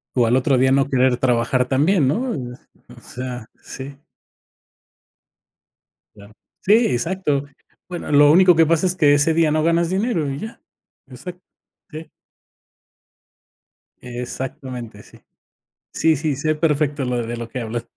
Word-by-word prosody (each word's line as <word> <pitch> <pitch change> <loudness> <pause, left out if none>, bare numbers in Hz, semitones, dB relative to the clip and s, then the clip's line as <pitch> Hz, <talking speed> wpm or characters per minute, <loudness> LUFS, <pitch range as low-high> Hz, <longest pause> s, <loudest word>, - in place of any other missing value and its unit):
O 125 -2 +3
al 115 +2 +2
otro 130 +1 +2
día 130 +1 +3
no 135 0 +2
querer 130 -2 +2
trabajar 125 0 +1
también, 145 +3 +2
¿no? 240 - -1
Eh, 125 -4 -6 0.4
o - - -16
sea, 125 -2 -7 0.2
sí. 135 +1 -9 2.2
Claro. 100 0 -16 0.3
Sí, 205 - +3 0.2
exacto. 145 +1 -1 0.4
Bueno, 175 -4 -6
lo 145 0 +6
único 180 0 +6
que 165 - +5
pasa 165 +2 +1
es 180 - -2
que 150 -5 +4
ese 145 +3 +2
día 160 -1 +2
no 155 0 +1
ganas 170 +1 +1
dinero 190 - -1
y 135 +1 -5
ya. 225 +1 -9 0.5
Exacto. 160 +8 -10 0.5
Sí. 155 +1 -9 1.9
Exactamente, 125 -2 -7
sí. - - -19 0.7
Sí, 160 -1 +2
sí, 150 0 -2
sé 155 +3 -1
perfecto 150 -3 0
lo 125 -1 -2
de 120 +1 -5
lo 115 - -6
que 125 +2 -6
hablas. 115 +1 -5
140 Hz, 145 wpm, -20 LUFS, 125-160 Hz, 2.2 s, lo